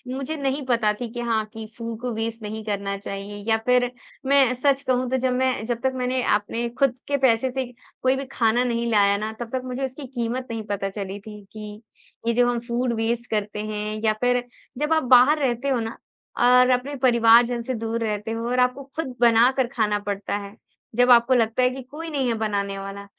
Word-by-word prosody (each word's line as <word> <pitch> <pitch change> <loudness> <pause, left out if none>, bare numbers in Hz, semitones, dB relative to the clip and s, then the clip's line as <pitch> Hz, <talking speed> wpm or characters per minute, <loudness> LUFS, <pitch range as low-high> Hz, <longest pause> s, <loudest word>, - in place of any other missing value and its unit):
मुझे 275 +4 -4
नहीं 275 0 -2
पता 230 -4 +2
थी 240 - -3
कि 240 - -5
हाँ 225 -2 0
कि 220 0 -7
फूड 230 -1 -5
को 250 0 -2
वेस्ट 225 +1 -4
नहीं 215 +1 -5
करना 200 -1 -2
चाहिए 200 +1 -7
या 220 - +4
फ़िर 250 0 +3 0.4
मैं 270 -2 +4
सच 275 +2 +1
कहूँ 255 -2 0
तो 260 - +2
जब 255 0 0
मैं 255 -3 0
जब 235 0 -3
तक 265 - +2
मैंने 255 0 -1
आपने 215 +3 -1
ख़ुद 275 -3 +3
के 285 - +1
पैसे 260 -1 +2
से 265 0 -2 0.4
कोई 260 +1 +3
भी 275 - -4
खाना 235 +1 +2
नहीं 235 -1 -1
लाया 200 -2 +4
ना 215 +1 -3
तब 240 -1 -5
तक 260 - 0
मुझे 255 +1 -3
इसकी 265 +2 -7
कीमत 240 +2 -2
नहीं 225 -1 -4
पता 195 -1 -1
चली 195 0 -6
थी 210 0 -11
कि 210 0 -9 0.5
ये 235 - +3
जो 245 +1 +3
हम 240 -1 0
फूड 240 0 0
वेस्ट 230 +2 -1
करते 210 -1 -2
हैं 215 0 -4
या 215 -1 +3
फ़िर 245 0 +2 0.3
जब 300 +3 +1
आप 315 - +2
बाहर 285 +5 +6
रहते 260 -1 0
हो 260 -3 +1
ना 225 0 -5 0.4
और 250 +1 +5
अपने 255 +3 0
परिवारजन 235 0 +5
से 255 +3 -3
दूर 225 +1 -3
रहते 215 0 -2
हो 230 +1 -3
और 250 0 +1
आपको 250 +2 +1
ख़ुद 280 -6 -4
बनाकर 240 +3 +5
खाना 210 -4 +1
पड़ता 205 -1 -3
है। 200 +1 -9 0.4
जब 245 +1 +4
आपको 240 +2 +6
लगता 230 0 +2
है 250 - +5
कि 260 +1 -6
कोई 325 +3 -6
नहीं 275 -4 -1
है 235 - +1
बनाने 200 -2 -2
वाला, 195 +1 -7
235 Hz, 215 wpm, -24 LUFS, 220-255 Hz, 0.5 s, बाहर